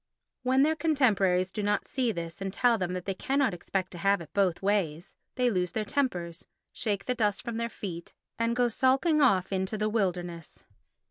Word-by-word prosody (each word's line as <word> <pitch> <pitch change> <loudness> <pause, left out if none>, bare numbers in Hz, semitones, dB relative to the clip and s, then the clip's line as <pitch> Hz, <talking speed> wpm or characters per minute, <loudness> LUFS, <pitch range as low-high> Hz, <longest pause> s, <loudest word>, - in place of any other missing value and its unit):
When 260 +1 +3
their 315 +2 +2
contemporaries 205 - +2
do 210 - -3
not 205 0 0
see 255 -3 0
this 170 -2 -6
and 195 0 -2
tell 240 +4 +3
them 180 -1 -2
that 180 -1 -4
they 195 - -1
cannot 270 +3 0
expect 185 +2 -3
to 175 - -8
have 200 +3 +3
it 165 -3 -11
both 190 -4 +2
ways, 185 -4 0 0.2
they 250 -1 +2
lose 180 -3 -1
their 215 -1 -1
tempers, 180 - -2 0.3
shake 205 -3 -2
the 250 - 0
dust 210 -4 0
from 235 -2 -4
their 235 0 -2
feet 170 -6 -7 0.2
and 230 0 +1
go 245 0 +3
sulking 270 +7 +2
off 195 -7 +3
into 190 +3 -1
the 215 +1 0
wilderness. 180 -6 -3
205 Hz, 195 wpm, -28 LUFS, 180-245 Hz, 0.3 s, When